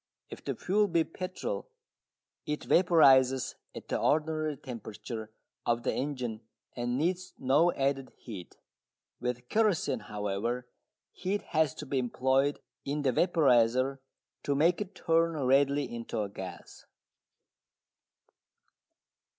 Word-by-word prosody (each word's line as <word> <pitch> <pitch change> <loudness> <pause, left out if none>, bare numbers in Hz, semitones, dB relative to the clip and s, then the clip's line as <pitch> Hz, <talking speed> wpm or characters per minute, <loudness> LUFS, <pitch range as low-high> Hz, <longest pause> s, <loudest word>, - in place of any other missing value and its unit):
If - - -9
the - - -3
fuel 205 +3 +2
be 170 -3 +2
petrol 185 - -5 0.8
it 150 0 -2
vaporises 135 -7 +5 0.2
at - - -8
the - - -1
ordinary 155 -1 +1
temperature 115 -3 -7 0.3
of 120 0 0
the - - 0
engine 125 -5 -3 0.3
and 120 0 -1
needs 180 +5 -1
no 145 +7 +4
added 135 -1 -1
heat. 100 -7 -9 0.6
With 125 0 -3
kerosene, 215 - +2
however, 105 +4 -2 0.4
heat 195 +3 -2
has 155 -3 +2
to 150 - -7
be 135 -1 0
employed 130 +3 +1 0.2
in 145 +1 -2
the 135 - +3
vaporiser 130 -4 +3 0.4
to 140 - 0
make 170 +7 +3
it 200 -1 -6
turn 165 0 +2
readily 140 +1 +3
into 115 -1 -4
a 100 - -4
gas. 100 - -9
135 Hz, 120 wpm, -30 LUFS, 125-165 Hz, 0.8 s, vaporises